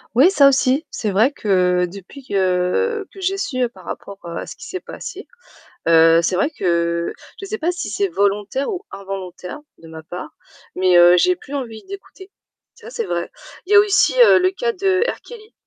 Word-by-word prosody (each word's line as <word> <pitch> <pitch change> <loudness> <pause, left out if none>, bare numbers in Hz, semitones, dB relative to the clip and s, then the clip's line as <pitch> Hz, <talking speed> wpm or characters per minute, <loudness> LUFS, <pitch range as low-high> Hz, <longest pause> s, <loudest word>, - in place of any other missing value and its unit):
Oui, 285 +9 +6
ça 280 -8 +6
aussi. 275 +3 +1
C'est 215 - -3
vrai 220 +8 +3
que 180 -7 +1
depuis 200 +9 -12
que 195 - 0
que 390 - -11
j'ai 385 +1 -1
su 255 -10 -1
par - - -17
rapport, 200 0 -8
heu, 170 0 -7
à - - -5
ce - - -10
qui - - -11
s'est 370 - -6
passé, - - -9 0.6
heu, 165 0 +6
c'est 180 - 0
vrai 195 +11 +1
que 170 -2 0 0.3
je - - -6
sais 430 +2 -4
pas 335 +3 0
si 360 - -5
c'est 400 -1 -1
volontaire 205 - -1
ou 370 -1 -5
involontaire 190 +3 -7 0.2
de 165 - -14
ma 160 0 -10
part, 175 +3 -8 0.4
mais, 185 -1 +3
heu, 175 0 +7
j'ai 365 - +3
plus 285 - -12
envie 230 -5 -6
d'écouter. 390 0 -11 0.5
Ça, - - -12
c'est 460 -2 -3
vrai. - - -3 0.3
Il 380 - -8
y - - +7
a - - +10
aussi, 410 -1 +3
heu, 470 - +7
le 370 +1 +2
cas 470 +4 -2
de 385 -1 +1
R - - -5
Kelly. 445 -2 -13
250 Hz, 205 wpm, -20 LUFS, -, 0.6 s, a